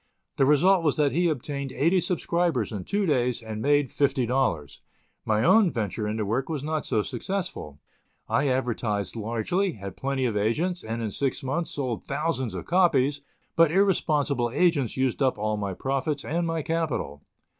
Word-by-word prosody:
The 135 Hz, -, +4 dB
result 175 Hz, +5 st, +4 dB
was 150 Hz, -4 st, +2 dB
that 145 Hz, -2 st, +2 dB
he 175 Hz, +3 st, +2 dB
obtained 140 Hz, -1 st, -3 dB
eighty 170 Hz, +6 st, +3 dB
subscribers 170 Hz, -, 0 dB
in 100 Hz, -4 st, -5 dB
two 205 Hz, 0 st, 0 dB
days, 125 Hz, -6 st, +1 dB
and 110 Hz, -1 st, -6 dB
made 145 Hz, 0 st, +2 dB
$50. 125 Hz, -, 0 dB, 0.5 s
My 110 Hz, 0 st, +1 dB
own 215 Hz, -, +5 dB
venture 105 Hz, -2 st, -2 dB
in 105 Hz, +1 st, -2 dB
the 110 Hz, -, -1 dB
work 125 Hz, +8 st, -1 dB
was 150 Hz, -4 st, -3 dB
not 155 Hz, -1 st, -2 dB
so 105 Hz, -, +1 dB
successful; 175 Hz, -, -4 dB, 0.5 s
I 140 Hz, -, +1 dB
advertised 120 Hz, -6 st, -1 dB
largely, 115 Hz, -, -1 dB
had 100 Hz, -4 st, -8 dB
plenty 135 Hz, -1 st, -1 dB
of 115 Hz, -4 st, -1 dB
agents, 155 Hz, -, 0 dB
and, 115 Hz, +1 st, -4 dB
in 110 Hz, -, -2 dB
six 135 Hz, +5 st, -2 dB
months, 150 Hz, +6 st, -2 dB
sold 130 Hz, -5 st, -3 dB
thousands 140 Hz, -4 st, -2 dB
of -, -, -5 dB
copies; 145 Hz, -6 st, +2 dB, 0.3 s
but 165 Hz, -1 st, +5 dB
irresponsible 150 Hz, -9 st, +2 dB
agents 145 Hz, -4 st, +1 dB
used 130 Hz, 0 st, 0 dB
up 130 Hz, -4 st, +2 dB
all 105 Hz, +1 st, -1 dB
my 100 Hz, -3 st, -3 dB
profits 135 Hz, -, -2 dB
and 170 Hz, +2 st, -1 dB
my 165 Hz, -1 st, -2 dB
capital. 150 Hz, -, -2 dB
135 Hz, 170 wpm, -26 LUFS, 115-165 Hz, 0.5 s, own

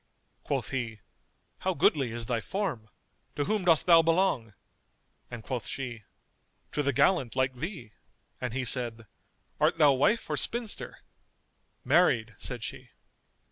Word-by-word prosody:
Quoth -, -, -2 dB
he, 115 Hz, -5 st, -3 dB, 0.6 s
"How 185 Hz, -1 st, -1 dB
goodly 135 Hz, -8 st, +2 dB
is 115 Hz, 0 st, -5 dB
thy 115 Hz, -1 st, -1 dB
form! 165 Hz, -, -3 dB, 0.5 s
To 145 Hz, -, 0 dB
whom 210 Hz, -1 st, 0 dB
dost 165 Hz, -3 st, +4 dB
thou 170 Hz, -2 st, +7 dB
belong?"; 165 Hz, -, +1 dB, 0.7 s
and 120 Hz, -2 st, -8 dB
quoth 125 Hz, -2 st, -4 dB
she, 120 Hz, -6 st, -6 dB, 0.7 s
"To 150 Hz, -, 0 dB
the 140 Hz, -1 st, +1 dB
gallant[FN#227] 130 Hz, -2 st, +2 dB
like 130 Hz, 0 st, +1 dB
thee;" 155 Hz, -, -6 dB, 0.5 s
and 125 Hz, -2 st, -2 dB
he 125 Hz, +2 st, -2 dB
said, 115 Hz, -2 st, -1 dB, 0.5 s
"Art -, -, +3 dB
thou 150 Hz, -3 st, +6 dB
wife 145 Hz, -, +2 dB
or -, -, -2 dB
spinster?" 235 Hz, -2 st, -2 dB, 0.8 s
"Married," 120 Hz, -11 st, +3 dB
said 120 Hz, -3 st, -4 dB
she. -, -, -6 dB
130 Hz, 140 wpm, -29 LUFS, 120-170 Hz, 0.8 s, thou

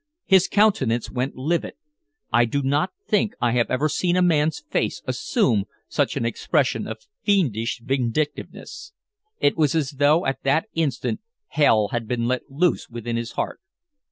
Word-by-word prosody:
His 190 Hz, -2 st, +5 dB
countenance 140 Hz, -, +2 dB
went 130 Hz, +2 st, -2 dB
livid. 155 Hz, +6 st, -1 dB, 0.6 s
I 120 Hz, +1 st, +5 dB
do 140 Hz, +5 st, -1 dB
not 145 Hz, +6 st, +1 dB, 0.2 s
think 210 Hz, -1 st, +1 dB
I 120 Hz, -, +2 dB
have 120 Hz, 0 st, +1 dB
ever 135 Hz, +4 st, +1 dB
seen 175 Hz, +3 st, 0 dB
a 180 Hz, -, +3 dB
man's 160 Hz, -, +2 dB
face -, -, -1 dB
assume 120 Hz, -, +1 dB, 0.2 s
such -, -, 0 dB
an -, -, -1 dB
expression 125 Hz, 0 st, 0 dB
of 110 Hz, 0 st, -8 dB, 0.2 s
fiendish 120 Hz, -, +1 dB
vindictiveness. 135 Hz, -, -3 dB, 0.5 s
It 145 Hz, -, +3 dB
was 155 Hz, -2 st, +2 dB
as 150 Hz, -3 st, 0 dB
though 150 Hz, +4 st, +4 dB
at 135 Hz, -, -1 dB
that 145 Hz, +8 st, +1 dB
instant 140 Hz, -, -1 dB, 0.3 s
hell 110 Hz, -8 st, +3 dB
had 115 Hz, -2 st, -3 dB
been 120 Hz, 0 st, -1 dB
let 130 Hz, +1 st, -2 dB
loose 165 Hz, +6 st, 0 dB
within 120 Hz, 0 st, -4 dB
his 115 Hz, 0 st, -3 dB
heart. -, -, -3 dB
135 Hz, 155 wpm, -23 LUFS, 120-165 Hz, 0.6 s, His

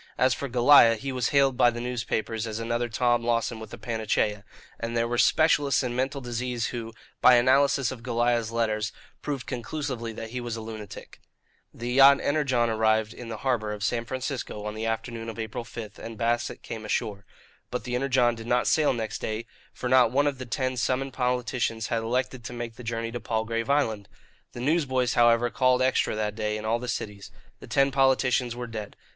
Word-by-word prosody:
As 130 Hz, 0 st, +4 dB
for 140 Hz, -, -5 dB
Goliah, 120 Hz, -1 st, +7 dB
he 135 Hz, +5 st, -5 dB
was 125 Hz, -2 st, 0 dB
hailed 140 Hz, -2 st, +3 dB
by 120 Hz, -, +6 dB
the 120 Hz, 0 st, -5 dB
newspapers 115 Hz, -2 st, -2 dB
as 110 Hz, -1 st, -4 dB
another 120 Hz, +1 st, -2 dB
Tom 120 Hz, 0 st, +1 dB
Lawson 115 Hz, -1 st, 0 dB
with 110 Hz, -, -9 dB
a 120 Hz, -, -8 dB
panacea; 110 Hz, -3 st, -1 dB, 0.4 s
and 115 Hz, 0 st, -3 dB
there 115 Hz, 0 st, +1 dB
were 120 Hz, 0 st, -1 dB
specialists 145 Hz, -4 st, +3 dB
in 120 Hz, -1 st, -3 dB
mental 135 Hz, +2 st, -1 dB
disease 120 Hz, -1 st, -3 dB
who, 115 Hz, -2 st, -5 dB, 0.3 s
by 125 Hz, -, +8 dB
analysis 135 Hz, +1 st, +3 dB
of 130 Hz, -3 st, -8 dB
Goliah's 120 Hz, -1 st, 0 dB
letters, 110 Hz, -1 st, 0 dB, 0.3 s
proved 140 Hz, -4 st, -4 dB
conclusively 125 Hz, -2 st, -4 dB
that 110 Hz, 0 st, -7 dB
he 125 Hz, 0 st, -4 dB
was 120 Hz, -2 st, -4 dB
a 115 Hz, -, -6 dB
lunatic. 110 Hz, -2 st, -9 dB, 0.5 s
The 120 Hz, +1 st, -5 dB
yacht 135 Hz, +2 st, +7 dB
Energon 135 Hz, -5 st, +1 dB
arrived 110 Hz, -1 st, +1 dB
in 120 Hz, -2 st, -9 dB
the 110 Hz, -, -5 dB
harbour 115 Hz, -5 st, 0 dB
of 105 Hz, -1 st, -6 dB
San 115 Hz, +1 st, 0 dB
Francisco 130 Hz, -4 st, -4 dB
on 105 Hz, -, -3 dB
the 110 Hz, +1 st, -3 dB
afternoon 115 Hz, 0 st, -3 dB
of 115 Hz, -, -8 dB
April 115 Hz, +2 st, -4 dB
5, 110 Hz, -3 st, -9 dB
and 115 Hz, -1 st, -8 dB
Bassett 120 Hz, +1 st, -1 dB
came 110 Hz, -1 st, -6 dB
ashore. 105 Hz, -1 st, -2 dB, 0.5 s
But -, -, -4 dB
the 125 Hz, +1 st, -5 dB
Energon 125 Hz, -1 st, +2 dB
did 115 Hz, 0 st, -9 dB
not 120 Hz, 0 st, +2 dB
sail 155 Hz, -3 st, +3 dB
next 110 Hz, -2 st, -4 dB
day, 110 Hz, +1 st, -3 dB, 0.3 s
for 125 Hz, -, -5 dB
not 125 Hz, -2 st, +5 dB
one 140 Hz, +3 st, +2 dB
of 140 Hz, -3 st, -1 dB
the 130 Hz, -, -6 dB
ten 130 Hz, +2 st, -2 dB
summoned 130 Hz, +2 st, -1 dB
politicians 125 Hz, -3 st, -1 dB
had 115 Hz, -, 0 dB
elected 125 Hz, +2 st, -2 dB
to -, -, -6 dB
make 120 Hz, -1 st, -6 dB
the 125 Hz, -, -10 dB
journey 115 Hz, 0 st, -3 dB
to 120 Hz, -, -4 dB
Palgrave 115 Hz, +2 st, -2 dB
Island. 110 Hz, -8 st, 0 dB, 0.4 s
The 120 Hz, -, -7 dB
newsboys, 130 Hz, -4 st, +1 dB
however, 120 Hz, 0 st, +4 dB
called 130 Hz, -1 st, +3 dB
"Extra" 130 Hz, -3 st, +1 dB
that 105 Hz, -1 st, -1 dB
day 105 Hz, 0 st, -2 dB
in 110 Hz, -, -7 dB
all 115 Hz, +2 st, +1 dB
the 125 Hz, -, -6 dB
cities. 105 Hz, -4 st, -5 dB, 0.3 s
The -, -, -11 dB
ten 135 Hz, 0 st, +2 dB
politicians 130 Hz, -2 st, +2 dB
were 125 Hz, 0 st, -5 dB
dead. 110 Hz, -3 st, -7 dB
120 Hz, 200 wpm, -26 LUFS, 115-130 Hz, 0.5 s, by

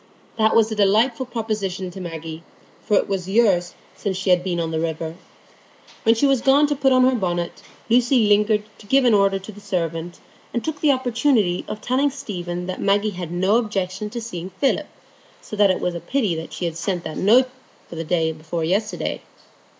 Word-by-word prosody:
That 220 Hz, -1 st, +2 dB
was 225 Hz, -1 st, +4 dB
a -, -, -2 dB
delightful 225 Hz, +5 st, +2 dB
proposition 205 Hz, -6 st, -3 dB
to 190 Hz, -, -8 dB
Maggie, 165 Hz, -2 st, -6 dB, 0.4 s
for 210 Hz, -, +1 dB
it -, -, +1 dB
was 190 Hz, -2 st, -3 dB
years 195 Hz, -5 st, +2 dB, 0.2 s
since 195 Hz, -3 st, -3 dB
she 190 Hz, 0 st, 0 dB
had 180 Hz, 0 st, +4 dB
been 180 Hz, -2 st, -2 dB
on 165 Hz, -1 st, -2 dB
the 160 Hz, -, -1 dB
river. 160 Hz, 0 st, -3 dB, 0.9 s
When 225 Hz, +1 st, +4 dB
she 230 Hz, -, +2 dB
was 270 Hz, -3 st, +3 dB
gone 275 Hz, +3 st, +5 dB
to 290 Hz, 0 st, 0 dB
put 270 Hz, -1 st, +2 dB
on 255 Hz, 0 st, +5 dB
her 260 Hz, +1 st, +4 dB
bonnet, 175 Hz, -6 st, -2 dB, 0.3 s
Lucy 240 Hz, 0 st, +4 dB
lingered 210 Hz, +1 st, +3 dB, 0.2 s
to 205 Hz, -, -15 dB
give 270 Hz, +3 st, +4 dB
an 240 Hz, -, +5 dB
order 195 Hz, -1 st, +3 dB
to 195 Hz, +3 st, -9 dB
the 205 Hz, 0 st, -14 dB
servant, 170 Hz, -2 st, -3 dB, 0.4 s
and 235 Hz, -, -2 dB
took 315 Hz, -2 st, -4 dB
the 300 Hz, -, +5 dB
opportunity 245 Hz, -7 st, +1 dB
of 215 Hz, -, -6 dB
telling 260 Hz, +5 st, +1 dB
Stephen 180 Hz, -10 st, -5 dB
that 185 Hz, 0 st, -5 dB
Maggie 205 Hz, +2 st, +2 dB
had 180 Hz, -3 st, -6 dB
no 190 Hz, +5 st, +2 dB
objection 205 Hz, -3 st, -2 dB
to 235 Hz, -, -5 dB
seeing 180 Hz, -5 st, -6 dB
Philip, 265 Hz, +8 st, 0 dB, 0.5 s
so -, -, -8 dB
that 205 Hz, -1 st, +4 dB
it 185 Hz, -, +1 dB
was 180 Hz, -, -1 dB
a 170 Hz, -, -4 dB
pity 180 Hz, -10 st, -1 dB
she 155 Hz, +3 st, -5 dB
had 165 Hz, -1 st, -3 dB
sent 180 Hz, 0 st, -2 dB
that 155 Hz, -, -6 dB
note 245 Hz, +6 st, +4 dB, 0.4 s
the 165 Hz, -1 st, -4 dB
day 165 Hz, -1 st, +1 dB
before 160 Hz, +1 st, -4 dB
yesterday. 200 Hz, +6 st, -1 dB
200 Hz, 200 wpm, -22 LUFS, 175-230 Hz, 0.9 s, gone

